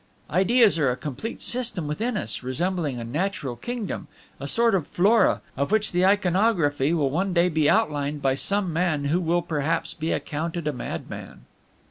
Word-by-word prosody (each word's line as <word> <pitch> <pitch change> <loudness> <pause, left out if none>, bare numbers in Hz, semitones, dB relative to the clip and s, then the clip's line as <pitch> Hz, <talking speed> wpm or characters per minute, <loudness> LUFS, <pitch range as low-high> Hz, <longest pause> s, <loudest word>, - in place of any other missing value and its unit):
"Ideas 200 +2 +4
are 140 -4 +3
a 125 - 0
complete 155 - -5
system 230 -10 0
within 215 +10 -2
us, - - -3
resembling 145 +1 -2
a - - -5
natural 145 - -2
kingdom, 240 - -5 0.3
a - - -5
sort 235 -1 +3
of 180 -6 0
flora, 210 +6 +3
of 140 +6 -1
which 215 -1 +2
the 180 +1 +3
iconography 180 -7 +2
will 150 -5 +1
one 185 +5 0
day 175 +1 +3
be 155 -3 +2
outlined 150 -8 +1
by 135 -1 +1
some 190 +5 -1
man 160 -3 0
who 155 +5 +2
will 175 +1 +1
perhaps 160 0 -1
be 160 0 -3
accounted 160 +1 -3
a 150 - 0
madman. 125 - -7
170 Hz, 170 wpm, -25 LUFS, 145-200 Hz, 0.3 s, Ideas